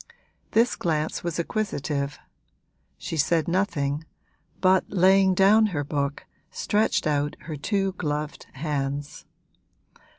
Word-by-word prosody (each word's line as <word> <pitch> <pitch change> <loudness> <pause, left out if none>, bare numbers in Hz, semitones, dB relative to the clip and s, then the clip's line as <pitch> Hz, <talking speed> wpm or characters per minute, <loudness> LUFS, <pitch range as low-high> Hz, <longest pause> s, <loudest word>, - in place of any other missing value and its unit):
This 235 +2 +3
glance 155 -3 -1
was 170 -2 -2
acquisitive; 145 -7 -2 0.8
she 165 - -5
said 160 +1 +2
nothing, 155 -5 0 0.6
but 185 0 +4
laying 190 0 +4
down 210 +4 +5
her 155 -8 -2
book 140 0 -2 0.2
stretched 205 -3 0
out 145 -1 0
her 155 0 -6
two 195 +6 0
gloved 150 -1 -3
hands. 140 0 -3
160 Hz, 105 wpm, -25 LUFS, 145-190 Hz, 0.8 s, down